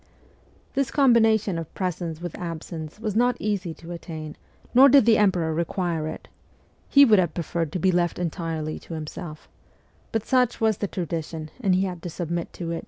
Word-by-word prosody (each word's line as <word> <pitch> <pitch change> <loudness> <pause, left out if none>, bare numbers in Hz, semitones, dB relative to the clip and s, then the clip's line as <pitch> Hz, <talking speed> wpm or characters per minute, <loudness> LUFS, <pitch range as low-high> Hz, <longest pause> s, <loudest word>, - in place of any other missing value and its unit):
This 275 -2 0
combination 225 - +3
of 165 - -7
presence 170 -3 -3
with 175 - -4
absence 165 0 -6
was 215 -2 -3
not 245 +1 +3
easy 200 -5 -2
to 170 +1 -11
attain, 160 -3 -7 0.4
nor 265 +3 +8
did 275 -4 +6
the 225 -2 +5
emperor 180 -6 +2
require 170 -1 -1
it: - - -7 0.6
he 280 0 +8
would 215 -6 +5
have 175 -4 0
preferred 165 -2 -2
to - - 0
be 185 +3 +3
left 175 -1 +1
entirely 165 -3 -3
to 165 - -8
himself; 155 0 -7 0.6
but 225 -2 -1
such 250 -2 +2
was 220 -3 +2
the 205 - -1
tradition, 160 -3 -4
and 195 -7 +2
he 185 - +2
had 180 -3 -4
to 175 - -5
submit 170 0 -4
to 170 -2 -5
it. 165 - -2
175 Hz, 180 wpm, -25 LUFS, 165-215 Hz, 0.6 s, nor